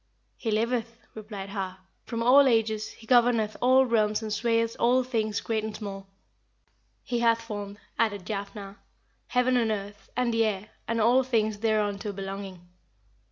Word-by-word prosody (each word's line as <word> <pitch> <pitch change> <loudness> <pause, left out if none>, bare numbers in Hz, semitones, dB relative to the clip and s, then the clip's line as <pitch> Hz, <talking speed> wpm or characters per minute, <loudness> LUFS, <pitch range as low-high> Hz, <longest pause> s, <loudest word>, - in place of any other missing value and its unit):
"He 230 - -4
liveth," 230 +1 -1 0.2
replied 210 -3 -7
Har, 190 -2 -4 0.3
"from 230 -1 -3
all 270 +3 +7
ages, 220 -3 +1
he 225 - -15
governeth 235 -3 +3
all 260 +2 +5
realms 215 -2 +1
and 215 -1 -3
swayeth 230 +1 +1
all 255 +2 +4
things 220 -4 -1
great 220 -2 -1
and 215 -1 -4
small." 195 -2 -7 1.0
"He 240 -1 -2
hath 230 -1 +3
formed," 205 -2 -6 0.2
added 205 -4 0
Jafnhar, 200 -1 -6 0.5
"heaven 250 0 +2
and 230 -2 +2
earth, 205 -1 -5
and 245 -2 +1
the 225 0 +3
air, 210 -1 -2 0.2
and 230 0 0
all 240 +4 +5
things 220 -5 0
thereunto 210 -2 0
belonging." 195 -2 -7
220 Hz, 155 wpm, -27 LUFS, 205-235 Hz, 1.0 s, all